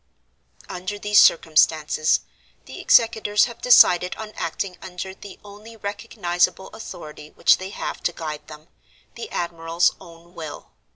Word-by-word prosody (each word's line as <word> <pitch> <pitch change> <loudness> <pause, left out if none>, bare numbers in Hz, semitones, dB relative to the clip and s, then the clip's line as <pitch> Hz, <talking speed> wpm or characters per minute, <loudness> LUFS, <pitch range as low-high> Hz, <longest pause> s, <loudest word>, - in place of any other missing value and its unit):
"Under 185 +3 -6
these 210 0 +4
circumstances, 155 -1 +3 0.4
the - - -10
executors 220 -3 +3
have 235 -2 -10
decided 180 -7 +5
on 215 -1 -8
acting 180 +3 -4
under 190 0 -7
the 195 0 -13
only 210 +3 -13
recognizable 200 -3 -2
authority 150 -7 -10
which - - +3
they 190 0 -6
have - - -6
to - - 0
guide 155 -3 -7
them—the 155 - -14
admiral's 170 0 -1
own 170 +1 -16
will. 160 -4 -9
180 Hz, 125 wpm, -22 LUFS, 165-205 Hz, 0.4 s, decided